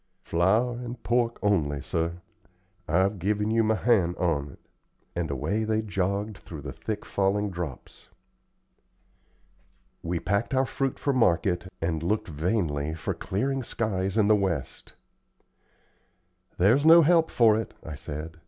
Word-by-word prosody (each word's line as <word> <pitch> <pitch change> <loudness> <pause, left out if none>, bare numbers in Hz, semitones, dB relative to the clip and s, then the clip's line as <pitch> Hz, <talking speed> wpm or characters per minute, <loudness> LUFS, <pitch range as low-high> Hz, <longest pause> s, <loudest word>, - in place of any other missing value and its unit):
"Flour 110 +8 +1
and 120 -1 -7
pork 120 0 +1
only, 80 -9 +1
sir. 85 +4 -3 0.7
I've 95 +5 +1
given 105 +4 0
you 115 0 +3
my 110 0 +2
hand 100 -7 +2
on't;" 75 -6 -1 0.6
and 85 -3 -2
away 95 - -1
they 110 0 0
all - - -10
jogged 100 +1 -2
through 80 -4 -9
the 70 -3 -6
thick 105 - -5
falling 100 +1 0
drops. 85 -7 -7 1.9
We 85 0 -2
packed 100 +9 -1
our 130 +1 +3
fruit 135 0 -2
for 140 - 0
market, 90 -5 +1
and 80 -2 -1
looked 105 +4 -1
vainly 80 -2 -1
for 80 - -3
clearing 135 +7 -2
skies 100 -4 -2
in 105 -2 +4
the 110 - +6
west. 85 -10 -3 1.6
"There's 115 +10 +4
no 165 +1 +8
help 165 +1 +4
for 115 -3 +4
it," 110 +1 -4
I 80 - -7
said. 75 +2 -7
100 Hz, 140 wpm, -27 LUFS, 85-110 Hz, 1.9 s, no